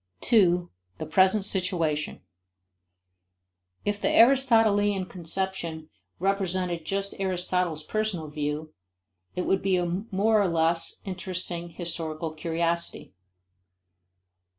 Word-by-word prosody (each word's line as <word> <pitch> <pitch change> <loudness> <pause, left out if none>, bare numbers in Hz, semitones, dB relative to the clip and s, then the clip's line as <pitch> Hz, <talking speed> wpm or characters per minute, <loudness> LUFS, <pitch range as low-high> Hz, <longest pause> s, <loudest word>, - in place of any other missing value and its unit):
2. 180 -6 +3 0.3
The - - -5
Present 190 +4 +3
Situation. 170 -6 -1 1.6
If 205 0 -1
the - - +2
Aristotelian 225 -6 +4
conception 170 -3 -4 0.3
represented 185 -3 -1
just 200 0 -1
Aristotle's 180 -4 -1
personal 210 -4 -2
view, 150 +1 -4 0.6
it 180 - -1
would 190 - +1
be 190 -1 +2
a 175 - 0 0.2
more 210 +2 +3
or 200 - +2
less 165 0 +1
interesting 180 -2 -4
historical 165 -2 -4
curiosity. 170 +1 -2
180 Hz, 95 wpm, -27 LUFS, 165-195 Hz, 1.6 s, Aristotelian